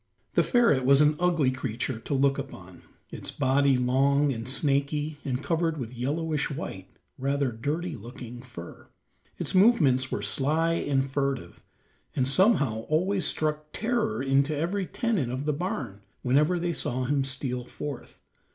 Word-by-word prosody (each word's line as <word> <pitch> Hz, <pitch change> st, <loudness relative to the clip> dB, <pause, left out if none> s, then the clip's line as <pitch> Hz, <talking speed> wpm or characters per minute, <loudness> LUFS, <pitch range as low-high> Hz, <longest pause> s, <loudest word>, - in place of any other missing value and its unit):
The -, -, +4 dB
ferret 235 Hz, -, +3 dB
was 135 Hz, +2 st, +5 dB
an 150 Hz, 0 st, +4 dB
ugly 170 Hz, -7 st, +2 dB
creature 125 Hz, -2 st, -3 dB
to 140 Hz, -, -3 dB
look 135 Hz, +1 st, +2 dB
upon, 95 Hz, -10 st, -9 dB, 0.3 s
its -, -, -6 dB
body 135 Hz, 0 st, +2 dB
long 135 Hz, +3 st, +2 dB
and 115 Hz, +1 st, -5 dB
snaky, 145 Hz, +2 st, 0 dB
and 130 Hz, 0 st, -2 dB
covered 165 Hz, -1 st, 0 dB
with 125 Hz, -3 st, -5 dB
yellowish 150 Hz, +4 st, -1 dB
white, 95 Hz, -, -6 dB, 0.3 s
rather 140 Hz, 0 st, 0 dB
dirty 155 Hz, +10 st, -3 dB
looking 120 Hz, +2 st, -9 dB
fur; 120 Hz, -10 st, -11 dB, 0.5 s
its -, -, -4 dB
movements 160 Hz, -, +4 dB
were 105 Hz, -, -2 dB
sly 155 Hz, +10 st, +1 dB
and 140 Hz, -5 st, +1 dB
furtive, 135 Hz, -1 st, -3 dB, 0.5 s
and 130 Hz, -2 st, +1 dB
somehow 140 Hz, -, +3 dB
always 180 Hz, +3 st, +1 dB
struck 155 Hz, 0 st, -1 dB
terror 225 Hz, -, -1 dB
to 140 Hz, +2 st, +2 dB
every 180 Hz, +5 st, -1 dB
tenant 210 Hz, -, -1 dB
of 130 Hz, +3 st, -3 dB
the 150 Hz, -, +1 dB
barn 175 Hz, -, -4 dB, 0.2 s
whenever 150 Hz, +8 st, +3 dB
they 170 Hz, 0 st, -1 dB
saw 130 Hz, -4 st, -1 dB
him 140 Hz, +1 st, +1 dB
steal 130 Hz, -2 st, -2 dB
forth. 140 Hz, 0 st, -7 dB
140 Hz, 150 wpm, -27 LUFS, 130-160 Hz, 0.5 s, was